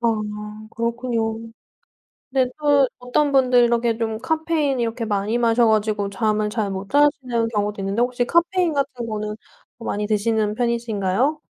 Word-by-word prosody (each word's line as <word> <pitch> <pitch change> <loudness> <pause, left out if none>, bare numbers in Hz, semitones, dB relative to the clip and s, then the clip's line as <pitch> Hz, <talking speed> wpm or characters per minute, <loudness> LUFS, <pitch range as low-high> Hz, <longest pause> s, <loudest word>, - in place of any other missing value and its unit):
아 235 - +1 0.7
그렇군요. 230 -1 -1 0.9
네. 260 -1 +2
또 285 -3 +4
어떤 250 +4 +1
분들 255 -2 +5
이렇게 235 -1 +1
좀 220 -1 -2
카페인 315 -1 0
이렇게 230 0 -2
많이 210 +2 -1
마셔 235 0 +3
가지고 215 -2 +1
잠을 210 +1 0
잘 210 -2 -2
못 195 +1 -6
자시는 270 -5 +2
경우도 210 -2 -2
있는데 195 +4 0
혹시 245 0 0
카페인 340 +2 +2
같은 265 -4 -2
거는 215 -1 -4 0.4
많이 210 -2 -3
드시는 215 0 +1
편이신가요? 235 +3 0
235 Hz, 310 characters per minute, -22 LUFS, 215-255 Hz, 0.9 s, 분들